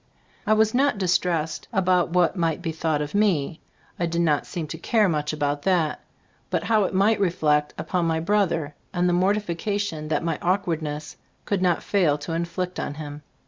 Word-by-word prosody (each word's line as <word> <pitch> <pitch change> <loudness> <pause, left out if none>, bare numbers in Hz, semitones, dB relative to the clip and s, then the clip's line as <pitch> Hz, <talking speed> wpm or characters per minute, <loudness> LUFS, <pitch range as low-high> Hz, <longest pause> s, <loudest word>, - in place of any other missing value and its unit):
I 215 - +5
was 220 0 +3
not 275 -2 +2
distressed 175 -4 0
about 185 -5 +2
what 175 +1 +2
might 165 -1 -1
be 165 - -1
thought 155 -2 -1
of 145 - -7
me. 180 -7 +1 0.4
I 170 - +1
did 170 +1 0
not 150 -4 +1
seem 170 -3 -4
to 160 - -6
care 215 +2 +2
much 150 -3 -1
about 145 -1 -1
that; 175 -4 +1 0.5
but - - -1
how 215 -3 +3
it - - -3
might 205 +4 +3
reflect 155 -6 +1
upon 180 -2 -1
my 160 0 +1
brother, 165 -5 0 0.2
and 175 0 +2
the 175 - +2
mortification 195 -2 -1
that 155 0 0
my 165 - -1
awkward 175 -3 0
ness 150 0 -6 0.3
could 200 -3 -1
not 180 -2 +2
fail 175 -8 +2
to 155 +3 -5
inflict 170 +2 -3
on 145 - -3
him. 150 -1 -7
170 Hz, 185 wpm, -24 LUFS, 155-190 Hz, 0.5 s, I